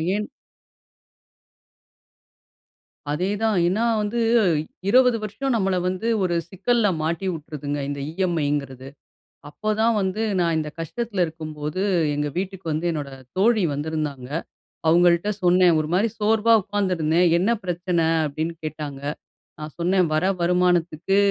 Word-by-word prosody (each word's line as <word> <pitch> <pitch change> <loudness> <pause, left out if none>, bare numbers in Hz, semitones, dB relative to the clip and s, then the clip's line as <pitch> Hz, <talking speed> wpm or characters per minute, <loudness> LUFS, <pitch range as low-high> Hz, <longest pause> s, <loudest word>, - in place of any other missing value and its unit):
ஏன்? 210 0 -2 2.8
அதேதான். 200 +6 0
ஏன்னா 215 +6 +1 0.2
வந்து 215 +3 -2 0.7
20 250 0 +5
வருஷம் 255 +5 -2
நம்மல 195 -3 +1
வந்து 185 +5 -2 0.2
ஒரு 175 -2 0
சிக்கல்ல 230 +3 +1
மாட்டி 165 +4 -2
உட்டுருதுங்க 145 -2 -5
இந்த 140 0 -4
இ.எம்.ஐங்கிறது. 145 -7 -2 0.6
அப்போதான் 215 +6 0
வந்து 190 +3 -1 0.2
நான் 170 -2 +1
இந்த 150 -1 -3
கஷ்டத்தில 200 +3 -2
இருக்கும்போது, 155 +1 -5 0.3
எங்க 150 0 -1
வீட்டுக்கு 190 -1 -4
வந்து 160 +3 -2
என்னோட 145 -3 -4 0.3
தோழி 215 0 +3
வந்திருந்தாங்க. 145 -3 -4 0.6
அவுங்கள்ட்ட 175 +3 +4
சொன்னேன். 180 -1 +5
ஒரு 155 0 -1
மாரி 205 +5 +3
சோர்வா 220 +2 +3
உட்காந்துருந்தேன். 180 -4 +1
"என்ன 195 +6 +1
பிரச்சனை?" 175 -1 0 0.2
அப்படீன்னு 160 +3 -3
கேட்டாங்க. 150 -3 -5 0.6
நான் 150 0 -8
சொன்னேன், 180 +1 +2
"வர 155 - +1 0.2
வருமானத்துக்கு 180 0 +1
175 Hz, 115 wpm, -23 LUFS, 155-205 Hz, 2.8 s, 20